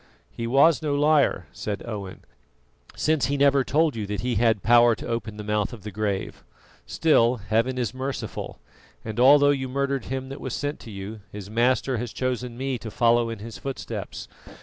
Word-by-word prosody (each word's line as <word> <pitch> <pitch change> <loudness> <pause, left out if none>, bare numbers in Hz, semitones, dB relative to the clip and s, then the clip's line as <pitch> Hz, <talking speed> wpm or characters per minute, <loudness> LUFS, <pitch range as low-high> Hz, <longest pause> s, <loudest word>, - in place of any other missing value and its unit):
"He 115 - -5
was 140 +3 +4
no 150 -2 -1
liar," 150 0 +3
said 100 -2 -4
Owen; 100 -5 -7 0.7
"since 155 -2 +1
he 140 +1 -1
never 140 -1 +4
told 150 +3 +1
you 105 -3 -4
that 105 -1 -3
he 125 0 -1
had 110 -2 +2
power 120 0 +6
to - - -9
open 115 -2 -4
the 105 - -6
mouth 105 +1 -1
of 110 - -10
the 105 - -6
grave. 100 -1 -3 0.4
Still, 125 -7 +3
Heaven 115 +4 0
is 120 -4 -1
merciful, 130 +1 -5 0.5
and 110 +1 -4
although 145 +3 +7
you 130 -2 -2
murdered 140 -1 -1
him 130 0 -4
that 135 - -8
was 130 - -4
sent 145 +1 -3
to - - -11
you, 100 +2 -7
his 100 0 -8
Master 125 +2 +1
has 120 0 -4
chosen 125 -1 -3
me 130 -1 -2
to 115 - -7
follow 120 +1 +2
in 115 - -5
his 110 +2 -9
footsteps. 135 -1 -6
120 Hz, 190 wpm, -25 LUFS, 110-135 Hz, 0.7 s, although